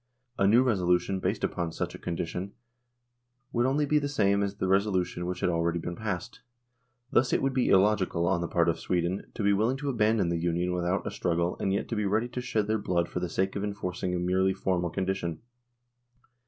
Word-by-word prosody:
A 100 - +4
new 115 +5 +6
resolution 95 -4 +1
based - - -2
upon 85 -2 -1
such - - -3
a - - -9
condition 90 +3 -4 1.0
would 120 +1 +2
only 145 +3 +2
be 150 +1 +3
the 145 -1 -2
same 100 -7 +2
as 100 0 -1
the 95 - -2
resolution 95 -3 +1
which 90 - -4
had - - +2
already 85 0 0
been 85 +1 -4
passed.... 110 +3 -5 0.7
Thus 125 -2 +3
it - - +3
would 135 0 +1
be 130 -1 +1
illogical 95 -3 +3
on 85 -1 +1
the 85 - -2
part 85 0 +2
of 85 - +1
Sweden 90 +2 -1
to 110 - -3
be 100 0 +4
willing 110 +6 +1
to 145 +1 -3
abandon 110 -6 +2
the 85 -1 0
Union 85 +1 0
without 90 +2 -1
a - - -3
struggle 85 0 0
and 95 - 0
yet 100 - -1
to 115 - -2
be 105 -1 0
ready 110 +5 +1
to 125 - -4
shed 110 -4 0
their 110 +1 0
blood 85 -3 0
for - - -3
the 90 -1 -3
sake 95 +2 -1
of 100 - -2
enforcing 90 -3 -3
a - - 0
merely 95 +2 +1
formal 90 -2 0
condition." 95 -2 -3
95 Hz, 215 wpm, -28 LUFS, 90-110 Hz, 1.0 s, new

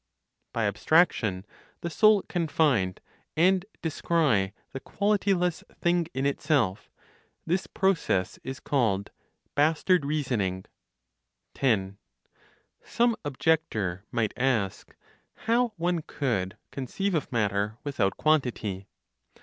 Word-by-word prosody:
BY 115 - 0
ABSTRACTION, 105 - +2 0.4
THE 170 - -4
SOUL 215 +3 +5
CAN 170 -3 -2
FIND 125 - +1 0.4
AND 185 +3 +4 0.2
DESCRY 150 - +1 0.2
THE 135 - -4
QUALITY 200 +5 +1
LESS 180 -2 -1 0.2
THING 175 -1 +2
IN 135 +1 -1
ITSELF: 140 - 0 0.6
THIS 180 +3 0
PROCESS 175 - 0
IS 130 0 -6
CALLED 110 -8 0 0.4
"BASTARD 160 +3 +3
REASONING." 125 -11 -1 0.9
10. 100 -7 0 0.9
(Some 235 -1 +1
objector) 120 - 0
might 115 -3 0
ask 120 -7 -1 0.5
how 235 0 +2
one 170 0 0
could 105 -12 -2
conceive 195 +9 -2
of 155 -3 -1
matter 105 -2 0
without 115 -10 0
quantity? 120 -11 0
140 Hz, 100 wpm, -27 LUFS, 105-170 Hz, 0.9 s, SOUL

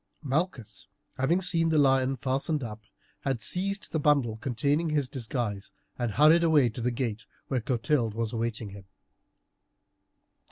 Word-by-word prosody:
Malchus, 140 - -3 0.3
having 165 +8 +2
seen 165 -3 +1
the 160 - +2
lion 135 -2 +3
fastened 135 +3 -1
up, 110 -2 -7 0.4
had 135 -3 -2
seized 195 - -1
the 160 - 0
bundle 140 -7 +2
containing 140 +8 0
his 145 -3 0
disguise, 120 -6 -4 0.2
and 120 -4 -2
hurried 155 +6 +6
away 150 -7 +4
to 115 +2 -7
the 120 - +1
gate 115 -3 -3 0.2
where 130 -3 0
Clotilde 120 -1 0
was 115 0 -2
awaiting 115 -2 -3
him. 100 -1 -11
130 Hz, 145 wpm, -28 LUFS, 115-150 Hz, 0.4 s, hurried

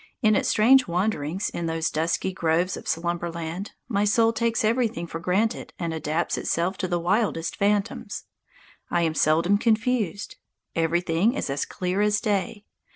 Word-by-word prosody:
In 215 -1 +5
its - - +1
strange 250 +5 +5
wanderings 180 -1 -1
in 170 - -3
those 165 0 -1
dusky 165 +4 -1
groves 170 +2 +1
of - - -9
Slumberland 170 +2 -3
my 205 -4 +1
soul 225 +2 +3
takes 230 0 0
everything 225 -6 0
for 165 -1 -6
granted 200 +7 -1
and 170 -2 -3
adapts 160 +1 -1
itself 175 +3 0
to 185 - -1
the 175 -1 0
wildest 175 -2 0
phantoms. 200 0 -1 0.7
I 175 -1 +1
am 160 -1 +1
seldom 165 +6 +3
confused. 220 -4 0 0.4
Everything 170 - +1
is 140 - -2
as 140 +1 -1
clear 185 +2 -2
as 210 0 +2
day. 205 -1 -2
185 Hz, 155 wpm, -25 LUFS, 165-215 Hz, 0.7 s, In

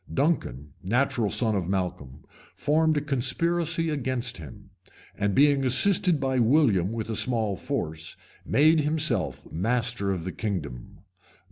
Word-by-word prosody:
Duncan, 75 - -1
natural 120 +1 0
son 110 -1 0
of 90 -3 -2
Malcolm, 90 -8 -4 0.3
formed 155 +1 +2
a - - +1
conspiracy 165 +4 0
against 130 -4 -3
him; 105 -2 -12 0.4
and 100 -2 -1
being 140 -1 +4
assisted 170 +6 +3
by 130 -2 0
William 115 - +3
with 115 -1 -4
a - - -2
small 110 -4 0
force, 80 -2 -4 0.3
made 155 +3 +4
himself 155 +1 -1
master 115 +2 -1
of 90 -4 -3
the 95 - -4
kingdom. 80 - -5
120 Hz, 130 wpm, -26 LUFS, 95-145 Hz, 0.4 s, being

